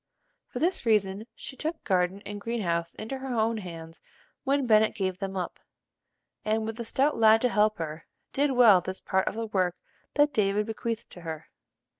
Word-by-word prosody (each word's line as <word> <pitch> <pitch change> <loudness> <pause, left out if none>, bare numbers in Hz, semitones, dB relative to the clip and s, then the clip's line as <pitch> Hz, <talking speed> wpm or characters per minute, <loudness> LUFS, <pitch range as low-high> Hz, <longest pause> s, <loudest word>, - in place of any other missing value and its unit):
For - - -8
this 345 +8 0
reason 210 -2 +1
she 265 - -8
took 315 +4 -4
garden 185 +1 +1
and 205 0 -6
green 230 0 -2
house 170 -1 -1
into 265 +5 -5
her 260 -2 -4
own 225 +1 +2
hands 165 -4 -8 0.4
when 275 0 +1
Bennet 220 -2 +4
gave 190 -3 -2
them 195 -1 -4
up, 180 - -4 0.8
and, 220 +1 0
with 225 +1 -5
a 235 - -3
stout 275 +6 +1
lad 220 0 +7
to 250 - +3
help 215 -1 +2
her, 155 -1 -6 0.3
did 285 +1 +2
well 225 -7 +7
this 185 +2 -5
part 190 -1 0
of - - -1
the 225 0 -2
work 185 -4 0 0.4
that 290 0 +4
David 210 -1 +2
bequeathed 230 +1 -4
to 175 - -11
her. 160 -2 -7
215 Hz, 190 wpm, -28 LUFS, 185-235 Hz, 0.8 s, lad